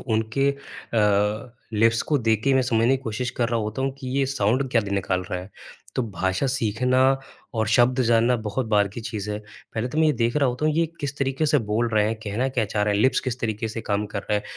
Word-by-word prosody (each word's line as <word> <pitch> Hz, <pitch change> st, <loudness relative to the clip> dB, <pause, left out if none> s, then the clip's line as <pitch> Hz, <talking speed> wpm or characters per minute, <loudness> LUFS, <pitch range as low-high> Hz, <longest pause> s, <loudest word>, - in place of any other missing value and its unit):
उनके 110 Hz, +4 st, 0 dB
अ, 110 Hz, -4 st, -1 dB, 0.2 s
लिप्स 115 Hz, +1 st, +3 dB
को 150 Hz, -, +1 dB
देख 110 Hz, -3 st, +1 dB
के 135 Hz, -1 st, +3 dB
मैं 130 Hz, -, +4 dB
समझने 115 Hz, -2 st, +2 dB
की 130 Hz, -, -13 dB
कोशिश 125 Hz, +1 st, -3 dB
कर 120 Hz, -1 st, -1 dB
रहा 120 Hz, -1 st, 0 dB
होता 110 Hz, +4 st, -3 dB
हूँ 135 Hz, 0 st, 0 dB
कि 130 Hz, -, -5 dB
ये 140 Hz, -, +3 dB
साउन्ड 130 Hz, +1 st, +1 dB
क्या 115 Hz, -, +3 dB
दी 100 Hz, -2 st, -6 dB
निकाल 95 Hz, -2 st, 0 dB
रहा 90 Hz, -, -1 dB
है। 95 Hz, +3 st, -11 dB, 0.4 s
तो 130 Hz, -, +1 dB
भाषा 95 Hz, +5 st, -1 dB
सीखना 125 Hz, 0 st, +1 dB, 0.6 s
और 110 Hz, -1 st, 0 dB
शब्द 125 Hz, +3 st, +4 dB
जानना 120 Hz, +1 st, +4 dB
बहुत 110 Hz, +4 st, -2 dB
बाद 105 Hz, -2 st, +3 dB
की 120 Hz, -, -6 dB
चीज़ 105 Hz, -2 st, -4 dB
है। 105 Hz, -, -2 dB, 0.4 s
पहले 110 Hz, +2 st, -1 dB
तो 150 Hz, -, -3 dB
मैं 160 Hz, -, +5 dB
ये 155 Hz, -, +4 dB
देख 120 Hz, -1 st, 0 dB
रहा 140 Hz, -3 st, +3 dB
होता 125 Hz, +4 st, -2 dB
हूँ 155 Hz, -, +2 dB
ये 165 Hz, +1 st, +3 dB, 0.2 s
किस 140 Hz, -1 st, -3 dB
तरीके 135 Hz, +3 st, 0 dB
से 150 Hz, 0 st, +4 dB
बोल 115 Hz, +1 st, 0 dB
रहे 105 Hz, -1 st, +4 dB
हैं, 110 Hz, -, 0 dB
कहना 110 Hz, +6 st, -1 dB
क्या 125 Hz, -4 st, 0 dB
चाह 105 Hz, 0 st, -1 dB
रहे 105 Hz, 0 st, +1 dB
हैं, 100 Hz, -, +1 dB
लिप्स 130 Hz, 0 st, +3 dB
किस 130 Hz, -1 st, -3 dB
तरीके 110 Hz, -1 st, -2 dB
से 115 Hz, +1 st, -5 dB
काम 105 Hz, -2 st, -1 dB
कर -, -, -4 dB
रहे -, -, -1 dB
हैं। -, -, -8 dB
115 Hz, 250 wpm, -24 LUFS, 105-130 Hz, 0.6 s, मैं